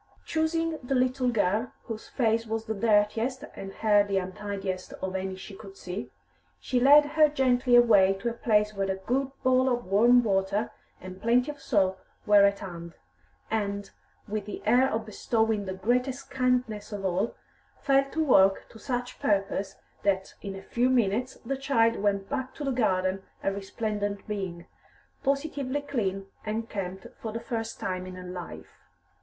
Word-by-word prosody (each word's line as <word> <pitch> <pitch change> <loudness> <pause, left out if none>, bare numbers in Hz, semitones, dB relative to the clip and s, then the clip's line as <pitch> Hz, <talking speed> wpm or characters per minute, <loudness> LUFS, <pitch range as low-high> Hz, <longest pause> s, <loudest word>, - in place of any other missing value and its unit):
Choosing 325 0 0
the 265 +1 -1
little 255 0 +2
girl 220 +1 0
whose 220 -1 -7
face 230 -2 0
was 225 0 -3
the 220 - -2
dirtiest 220 +4 +1
and 195 0 -7
hair 205 0 +3
the 200 -1 -1
untidiest 190 0 -4
of 190 0 -5
any 190 0 -3
she 190 +1 -10
could 195 -1 -12
see, 180 -9 -6 0.5
she 250 - 0
led 290 +4 +7
her 305 +1 +4
gently 255 -3 +3
away 210 -6 +6
to 195 +5 -5
a - - -5
place 210 -2 +2
where 195 -1 -2
a 190 - 0
good 255 +8 -1
bowl 255 0 +4
of 245 -1 -1
warm 235 +6 +5
water 200 +1 0 0.3
and 185 +1 -10
plenty 250 +5 +2
of 290 -1 -15
soap 190 -4 +1 0.3
were 205 -1 +7
at 200 0 +2
hand, 170 -3 -8 0.6
and, 200 -2 -2 0.4
with 210 -1 -3
the - - -6
air 250 +5 +4
of 220 0 -2
bestowing 220 -1 0
the 190 - -3
greatest 250 +7 -1
kindness 250 -5 0
of 200 -2 -4
all, 190 +5 0 0.4
fell 275 0 +3
to 320 +2 0
work 195 -9 +4
to 225 - -14
such 245 -1 -4
purpose 195 -1 0 0.3
that 190 -1 0
in 195 -1 -5
a 195 - -9
few 245 +5 +1
minutes 245 +1 +1
the 275 - -1
child 230 -4 +2
went 200 -1 0
back 265 -2 -4
to 295 - -6
the 275 - 0
garden 190 -6 +1 0.2
a 195 - +1
resplendent 205 0 -3
being, 190 -5 -4 0.6
positively 280 -1 -1
clean 205 -9 -2 0.2
and 225 +1 -3
kempt 190 -2 -5 0.2
for 220 - -4
the 230 - -4
first 225 -2 -4
time 185 0 -3
in 185 - -8
her 180 - -8
life. 180 -1 -9
215 Hz, 170 wpm, -28 LUFS, 195-250 Hz, 0.6 s, led